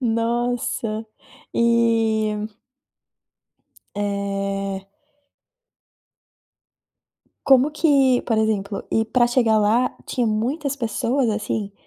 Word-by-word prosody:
Nossa 230 -1 -1 0.5
e 225 -2 +2 1.5
Eh 195 -1 -3 2.6
Como 270 +2 +5
que 275 -5 +3
por 225 -2 0
exemplo 210 -2 -1
e 225 - +2
para 240 +2 +2
chegar 240 -3 +2
lá 225 +4 +2
tinha 245 - -1
muitas 270 +7 -1
pessoas, 245 +1 0
assim? 210 -1 -2
225 Hz, 75 wpm, -22 LUFS, 210-245 Hz, 2.6 s, Como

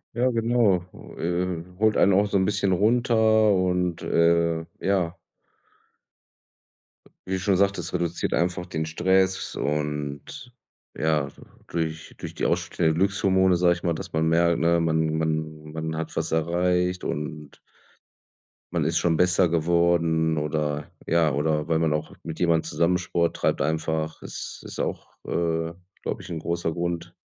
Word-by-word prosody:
Ja, 125 +2 +2
genau, 115 -6 +2 0.3
äh, 85 0 -1 0.2
holt 110 0 +3
einen 100 - +5
auch 100 +2 +4
so 100 - -3
'n 95 - +2
bisschen 100 -1 +1
runter 110 0 +3
und, 90 -2 0
äh, 85 -1 +2 0.2
ja. 95 -3 +1 2.1
Wie 95 - -2
du 95 - 0
schon 95 +1 +2
sagtest, 100 -3 0
reduziert 85 -1 -1
einfach 90 +1 0
den 80 -3 -3
Stress 95 +3 +1
und, 75 - -3 0.5
ja, 75 -3 +1
du - - -19 0.3
durch 80 -1 -4
durch - - -7
die - - -3
ausstehenden 80 -2 0
Glückshormone, 95 -1 +3
sag 85 0 +4
ich 85 - -8
mal, 85 - +1
dass 80 - -7
man 80 0 +1
merkt, 85 +1 +3
ne, 85 +1 +3
man 80 -1 +1
man 80 -1 -2
man 80 0 -4
hat 80 0 -5
was - - -2
erreicht 90 +2 +1
und 75 -1 -5 1.2
man - - +1
ist - - +1
schon 80 -2 +1
besser 90 0 +3
geworden 80 -1 +2
oder 75 -1 -2 0.2
ja, 80 -3 +2
oder 75 +2 0
weil 80 -1 +2
man 80 -2 +1
auch 75 - -3
mit 80 -1 -6
jemandem 85 -2 +3
zusammen 85 +2 +1
Sport 85 -1 -1
treibt - - 0
einfach. 80 0 -1
Es - - -7
ist - - -8
auch, - - -3 0.2
äh, 80 -1 -1 0.3
glaube - - -3
ich, - - -11
'n 85 -2 -4
großer 85 0 -2
Grund. 85 +1 -3
85 Hz, 150 wpm, -25 LUFS, 80-90 Hz, 2.1 s, einen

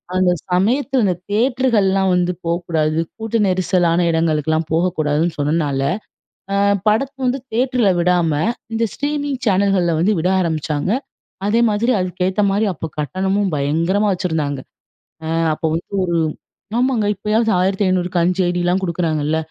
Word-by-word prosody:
அந்த 185 -1 +3 0.2
சமயத்தில 245 +8 +2
இந்த 185 - +2 0.2
தியேட்டருகள்லாம் 210 -5 +2
வந்து 180 0 +1
போக்கூடாது, 165 -2 0 0.2
கூட்ட 225 0 -2
நெரிசலான 180 -2 +2
இடங்களுக்கெல்லாம் 160 -1 0
போகக்கூடாதுன்னு 160 -1 0
சொன்னனால 145 -2 0 0.7
அ - - +2 0.3
படத்த 260 +6 +1
வந்து 255 +2 0
தியேட்டர்ல 245 -2 +2
விடாம 175 -2 +2 0.4
இந்த 225 +1 +1
ஸ்ட்ரீமிங் 285 -2 -2
சேனல்கள்ல 190 -4 +2
வந்து 205 +5 +2
விட 170 +3 0
ஆரம்பிச்சாங்க 155 -1 -1 0.6
அதே 225 +3 +2
மாதிரி 225 +4 +1
அதுக்கு 180 0 -2
ஏத்த 190 +2 0
மாரி 205 +3 +1
அப்போ 160 +1 -5
கட்டணமும் 190 +5 -1
பயங்கரமா 165 +9 +1
வச்சிருந்தாங்க! 155 -6 -2 0.7
அ - - -4 0.3
அப்ப 155 - -10
வந்து 165 - -6
ஒரு 170 -1 0 0.6
ஆமாங்க 245 -4 +1
இப்பயாவது 215 +3 0
1500 185 -1 +1
க்கு 175 - +1
5 180 +2 +1
ஐடிலாம் 175 +1 0
குடுக்குறாங்கல்ல. 160 -3 0
185 Hz, 130 wpm, -19 LUFS, 165-210 Hz, 0.7 s, அந்த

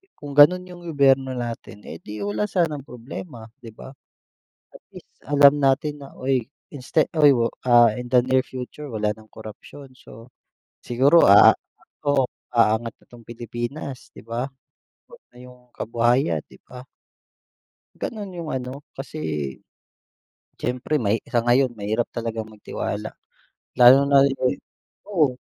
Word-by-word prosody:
kung 145 -1 -9
ganun 150 +6 +6
yung 180 -1 -12
gobyerno 135 -3 +2
natin, 115 -4 -7
eh, 80 - -9
di 105 -1 -8
wala 105 +1 -2
sanang 155 - -2
problema, 125 +1 -9 0.2
di 120 - -13
ba? 110 +3 -11 0.8
At - - -14
least - - -13 0.2
alam 145 0 +4
natin 145 +2 +1
na, 140 - -10
"Uy 130 -2 -1 0.2
inste 145 +2 0
uy, 150 -3 +5 0.3
ah, 120 -3 +5
in 125 +1 -7
the 125 -1 +3
near 130 0 +2
future 130 +3 -9
wala 105 -2 -1
ng 110 0 -19
korapsiyon, 110 +5 -12
so 120 -1 -16 0.5
siguro, 135 +7 +4
ah 100 +1 +8 0.6
oo, 145 -1 +3 0.3
aangat 115 0 +2
na - - -22
'tong 120 -2 -16
Pilipinas, 120 +4 -7
'di - - -12
ba, 115 +3 -4 0.6
pati 125 - -16
yung 125 -1 -19
kabuhayan, 120 - 0
'di - - -19
ba? 125 0 -11 1.1
Ganun 210 -4 -5
yung 165 -2 -5
ano, 130 +2 -6
kasi 135 +3 -8 1.4
siyempre 125 +5 -3
mahi 110 +1 +1
sa 120 -1 0
ngayon 120 +1 +2
mahirap 110 +3 -2
talagang 115 -2 -4
magtiwala. 110 -1 -6 0.7
Lalo 125 +1 +8
na 140 -1 +5
yung 135 -2 0 0.5
oo. 155 -11 +1
125 Hz, 135 wpm, -23 LUFS, 115-140 Hz, 1.4 s, ah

